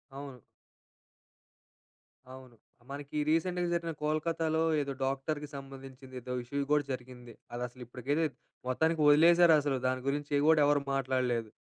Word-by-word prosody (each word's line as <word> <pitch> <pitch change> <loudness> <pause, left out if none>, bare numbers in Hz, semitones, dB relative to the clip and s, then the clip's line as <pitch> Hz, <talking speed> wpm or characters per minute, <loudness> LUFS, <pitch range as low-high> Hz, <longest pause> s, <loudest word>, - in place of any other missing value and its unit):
అవును. 135 -2 -8 1.9
అవును. 130 -2 -13 0.4
మనకి 145 +1 -6
రీసెంట్‌గా 175 +2 +1
జరిగిన 170 -1 -1
కోల్‌కత్తా‌లో 160 +1 0 0.2
ఏదో 140 -1 -3
డాక్టర్‌కి 145 +3 -2
సంబంధించింది 135 -1 -10
ఏదో 125 +1 -5
ఇష్యూ 140 +3 -2
కూడా 150 -1 +4
జరిగింది. 125 -1 -9 0.2
అదసలు 125 +1 -6
ఇప్పటికైతే 135 +6 -1 0.4
మొత్తానికి 160 +5 +1
వదిలేశారు 170 +2 +7
అసలు 140 -2 0
దాని 130 0 -1
గురించి 145 +1 -3
ఏవి 145 - +1
గూడా 160 -1 +5
ఎవరు 145 0 +3 0.2
మాట్లాడలేదు. 125 -4 0
140 Hz, 125 wpm, -31 LUFS, 130-155 Hz, 1.9 s, వదిలేశారు